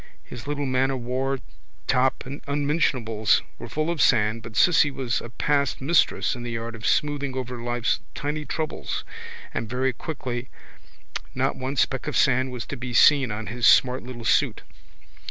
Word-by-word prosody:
His 120 +1 -10
little 145 -1 -2
man 130 0 +1
o' 135 - -1
war 130 +2 -1 0.5
top 130 +1 +1
and 140 +3 -7
unmentionables 140 -7 +1 0.2
were - - -8
full 155 +2 -1
of 165 -5 -1
sand 110 -1 +3
but 115 -1 -10
Cissy 160 0 +5
was 130 -3 -2
a 120 - -8
past 140 +3 0
mistress 150 +5 +2
in 125 - -6
the 120 -1 -3
art 115 0 -5
of 115 -1 -4
smoothing 140 -3 0
over 125 -2 -4
life's 120 -1 0 0.2
tiny 150 +2 -3
troubles 155 +2 -3 0.5
and 110 -1 -3
very 130 +2 0
quickly 125 -3 -5 0.9
not - - 0
one 130 +2 -4
speck 130 -1 0
of - - 0
sand 130 -1 +3
was 125 -2 -5
to 140 - -6
be 125 -1 -5
seen 140 -2 +6
on 110 +1 -4
his 120 +4 +1
smart 130 0 +5
little 120 -2 -8
suit. - - +2
130 Hz, 170 wpm, -25 LUFS, 120-140 Hz, 0.9 s, seen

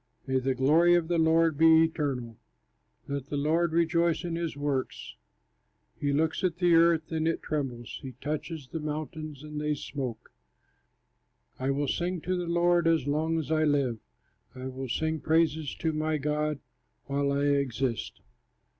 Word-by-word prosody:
May 130 -1 +1
the 130 0 -1
glory 160 +7 +5
of 170 -1 0
the 170 -1 +2
Lord 160 -1 +3
be 160 0 +7
eternal, 135 -8 -2 0.7
Let 140 -1 -4
the 145 - -3
Lord 160 +4 +1
rejoice 170 0 +2
in 170 -1 -3
his 165 -3 -3
works. 145 -2 -3 0.8
He 145 - -1
looks 155 +5 0
at 175 -2 0
the 175 -1 +3
earth, 165 -1 +4
and 160 0 0
it 165 - -1
trembles, 130 -6 -4
He 135 -2 -7
touches 150 +1 -5
the 165 - -4
mountains, 155 -1 -5
and 150 0 -5
they 150 0 0
smoke. 135 -4 -6 1.3
I 130 +1 -1
will 140 +1 0
sing 175 +4 -1
to 185 +3 -1
the 175 -1 -3
Lord 175 0 +3
as 165 -5 +2
long 155 +3 0
as 155 -2 -3
I 155 0 +3
live, 140 -6 +1 0.6
I 130 0 -7
will 130 0 -6
sing 160 +5 -1
praise 160 -2 +1
to 160 -2 -1
my 155 0 0
God 150 +1 -1 0.5
while 140 0 0
I 140 0 0
exist. 135 -4 -1
155 Hz, 165 wpm, -28 LUFS, 140-165 Hz, 1.3 s, be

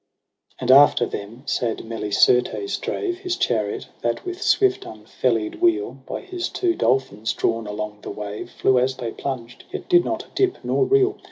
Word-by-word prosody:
And 125 0 +1
after 135 -2 +7
them 110 +5 -7
sad 120 -3 -1
Melicertes 115 - +1
drave 355 -3 -2
His 365 -2 -2
chariot, 110 - -1
that 120 0 -2
with 360 +1 -5
swift 395 -2 +3
unfeUied 340 -2 -2
wheel. 355 +4 +1
By - - -4
his 370 -2 -4
two 355 -2 0
dolphins 120 - 0
drawn 115 -1 -1
along 105 0 -5
the - - -7
wave. 105 0 -6
Flew 130 -1 +2
as 130 +1 +1
they 120 -3 -4
plunged, 120 -3 -6
yet - - -6
did 350 -1 +5
not - - -3
dip 380 -2 +1
nor 400 - +2
reel. 400 0 +3
130 Hz, 165 wpm, -23 LUFS, -, -, after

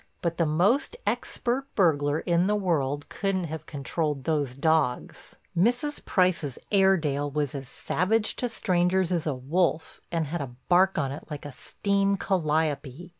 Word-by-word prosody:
But 170 -1 -1
the 165 - +2
most 200 - +2
expert 255 +3 -1
burglar 150 -5 +2
in 175 +1 +2
the 210 - +2
world 145 -8 0
couldn't 195 -2 -1
have 160 -1 -6
controlled 145 0 -2
those 145 -5 -1
dogs—Mrs. 170 - 0
Price's 175 -8 +1
Airdale 160 -8 +2
was 145 -2 -1
as 135 -2 -5
savage 210 - 0
to 245 - -1
strangers 185 -3 +1
as 170 -3 0
a 145 - 0
wolf 160 +5 -1
and 165 -2 0
had 165 +4 -3
a 125 -3 -6
bark 185 +2 +4
on 135 - 0
it 145 - -8
like 150 -1 -7
a 145 - -6
steam 200 +6 0
calliope. 155 -3 -1
165 Hz, 150 wpm, -27 LUFS, 145-190 Hz, -, bark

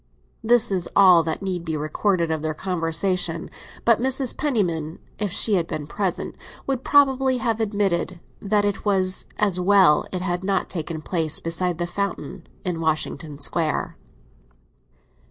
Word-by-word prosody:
This 240 0 +4
is 180 -3 -1
all 185 -4 +7
that 160 +4 -3
need 185 -3 -3
be 160 -2 -3
recorded 170 +3 0
of 160 -1 -1
their 155 0 -2
conversation; 170 0 -1 0.3
but 230 -1 +4
Mrs. 265 0 +1
Penniman, 175 - -1 0.2
if 205 -3 -1
she 215 - +3
had 175 -4 +1
been 150 - -4
present, 190 +3 -3 0.3
would 265 -2 -2
probably 270 -2 +3
have 230 -3 -1
admitted 195 -5 -1 0.2
that 205 0 +1
it 205 -1 -2
was 190 -2 0
as 200 -4 +2
well 185 -4 +4
it 185 -1 -3
had 175 0 -2
not 195 -1 -1
taken 160 -2 -4
place 160 -3 -1
beside 170 +1 -1
the 175 - -1
fountain 195 -1 -4 0.2
in 175 -3 -2
Washington 155 -2 -2
Square. 155 +2 -2
185 Hz, 150 wpm, -23 LUFS, 165-205 Hz, 0.3 s, all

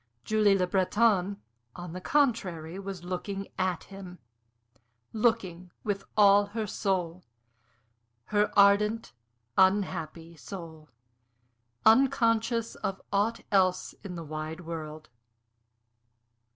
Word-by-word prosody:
Julie 210 -2 +3
Le 185 - +1
Breton, 195 +1 +1 0.4
on 175 -2 -8
the 185 - -6
contrary, 190 - 0
was 195 -2 -7
looking 195 +2 -5
at 185 -2 -1
him 190 -2 -11 1.0
looking 185 -6 0
with 200 -2 -2
all 205 0 +6
her 220 - 0
soul, 185 -4 -2 1.1
her 210 0 +3
ardent, 210 +2 +4 0.5
unhappy 170 -4 +1
soul 160 -2 -10 1.0
unconscious 230 -1 +3
of 195 0 -4
aught 205 +3 +1
else 185 -2 +2
in 190 -3 -7
the 170 - -6
wide 155 +2 -6
world. 155 -2 -7
195 Hz, 100 wpm, -28 LUFS, 175-210 Hz, 1.1 s, all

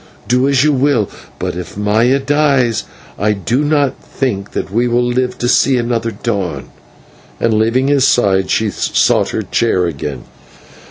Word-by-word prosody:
Do 125 +3 +2
as 135 -1 +3
you 150 0 +3
will, 130 -6 +1 0.3
but - - -3
if 90 +2 -7
Maya 110 +6 +2
dies 135 -5 +1 0.3
I 105 +1 +2
do 120 +8 -1
not 145 -3 0
think 105 -7 -3
that - - -4
we 120 +4 +1
shall 120 +1 +1
live 125 +1 -1
to 120 - -2
see 130 +1 +3
another 120 -1 -1
dawn," 100 -6 -4 0.7
and, 115 - +1
leaving 115 +5 +1
his 140 -2 +3
side, 95 -5 +2
she 110 -2 +1
sought - - +1
her - - -3
chair 95 -6 +1
again. 70 -5 -5
120 Hz, 160 wpm, -15 LUFS, 105-135 Hz, 0.7 s, as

